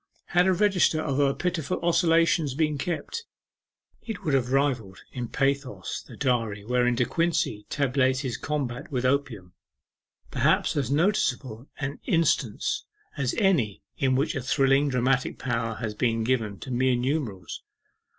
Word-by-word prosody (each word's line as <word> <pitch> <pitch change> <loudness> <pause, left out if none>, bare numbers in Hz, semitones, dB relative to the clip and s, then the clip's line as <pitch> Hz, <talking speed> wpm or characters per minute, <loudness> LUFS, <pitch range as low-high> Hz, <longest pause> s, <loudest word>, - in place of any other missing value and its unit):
Had 180 +1 +4
a 190 - +4
register 185 -4 +3
of 140 -4 -1
her 140 -1 +3
pitiful 175 -1 -2
oscillations 165 -4 +3
been 150 -1 0
kept, 175 - -3 0.8
it 225 -4 -6
would 150 - 0
have 130 -2 +1
rivalled 130 -8 0
in 125 -2 -4
pathos 135 -8 -1
the - - -13
diary 115 -5 0
wherein 125 +1 +2
De 125 - +2
Quincey 160 -10 -1
tabulates 130 -1 +1
his 130 -5 -3
combat 140 -1 -3
with 130 -2 -1
Opium 125 -9 -1 0.8
perhaps - - +2
as 140 -5 0
noticeable 135 - 0
an 140 +1 -4
instance 155 - +1 0.3
as 135 -3 -1
any 170 - +1
in 130 -1 +1
which 145 +4 +1
a 135 - -3
thrilling 135 +2 +3
dramatic 130 0 +1
power 115 -3 -2
has 110 -1 -4
been 115 +1 0
given 110 -4 0
to 130 - -7
mere 130 +1 +2
numerals. 120 - -3
135 Hz, 145 wpm, -26 LUFS, 120-150 Hz, 0.8 s, Had